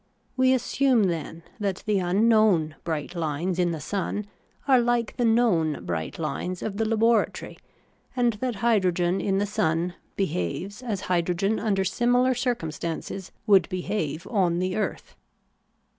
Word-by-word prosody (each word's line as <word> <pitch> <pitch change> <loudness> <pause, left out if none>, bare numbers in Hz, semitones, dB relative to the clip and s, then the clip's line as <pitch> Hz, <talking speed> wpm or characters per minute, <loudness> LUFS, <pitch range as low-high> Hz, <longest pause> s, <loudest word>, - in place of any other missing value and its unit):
We 260 0 +4
assume, 255 -1 +2
then, 165 -2 -3 0.2
that 200 -3 -2
the 210 -2 +2
unknown 190 -3 +3
bright 160 -1 -3
hnes 170 +1 -2
in 175 -1 +3
the 165 -2 -3
sun 200 +5 -3 0.4
are 260 -2 +6
hke 240 -1 0
the 245 - 0
known 220 -10 +2
bright 80 -2 -3
hnes 165 +4 -4
of 200 -2 -4
the 225 - +1
laboratory, 225 0 +1 0.6
and 240 -2 +2
that 255 -3 -1
hydrogen 185 -5 +2
in 195 -1 0
the 200 - +1
sun 170 -3 0 0.2
behaves 190 - -3
as 215 -6 -3
hydrogen 180 +3 0
under 195 -3 +1
similar 245 +6 +2
circumstances 185 - -3
would 195 -4 +5
behave 180 -4 -3
on 180 -6 +1
the 185 +1 -1
earth. 215 - -3
195 Hz, 140 wpm, -25 LUFS, 170-225 Hz, 0.6 s, are